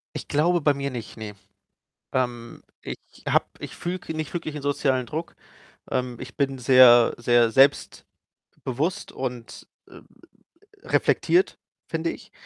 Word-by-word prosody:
Ich - - -6
glaube 170 +4 +2
bei 145 -1 +3
mir 140 0 -3
nicht, 120 -3 -8
ne. 105 -2 -7 0.8
Ähm, 120 -2 -3 0.2
ich - - -6 0.3
habe - - +3
ich - - -7
fühle 180 +2 -4
k 170 - -7
nicht 155 0 -5
wirklich 155 -3 -4
'nen 150 - -6
sozialen 135 -3 0
Druck. 160 +7 -6 0.5
Ähm, 125 -2 -2
ich 130 -1 -9
bin 135 -1 -1
sehr 125 -2 +7
sehr 120 -1 +3
selbstbewusst 135 +4 +1 0.8
und, 125 -3 -6 0.2
äh, - - -14 0.8
reflektiert, 365 +2 +2 0.3
finde - - -2
ich. - - -12
130 Hz, 135 wpm, -24 LUFS, 120-150 Hz, 0.8 s, sehr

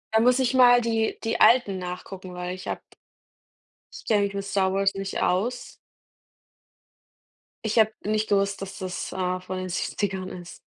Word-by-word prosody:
Da - - +6
muss 245 +2 +4
ich 260 -1 +1
mal 245 -1 +7
die 225 -2 0
die 225 - -1
alten 215 -4 +5
nachgucken, 180 0 -7
weil 180 0 -4
ich 185 - -9
habe - - -3 1.2
Ich - - -11
kenne 210 -2 +3
mich 200 0 -2
mit 200 0 -3
Star 195 -1 0
Wars 195 0 +2
nicht 195 0 -3
aus. 230 +8 -1 1.9
Ich 220 +1 +2
habe 220 0 +5
nicht 215 +1 0
gewusst, 200 -1 +1
dass 195 0 -7
das, 185 -1 -5
äh, 185 -1 -1
von 185 0 -6
den 185 0 -4
70ern 190 +1 -2
ist. 175 -1 -10
195 Hz, 170 wpm, -25 LUFS, 185-220 Hz, 1.9 s, mal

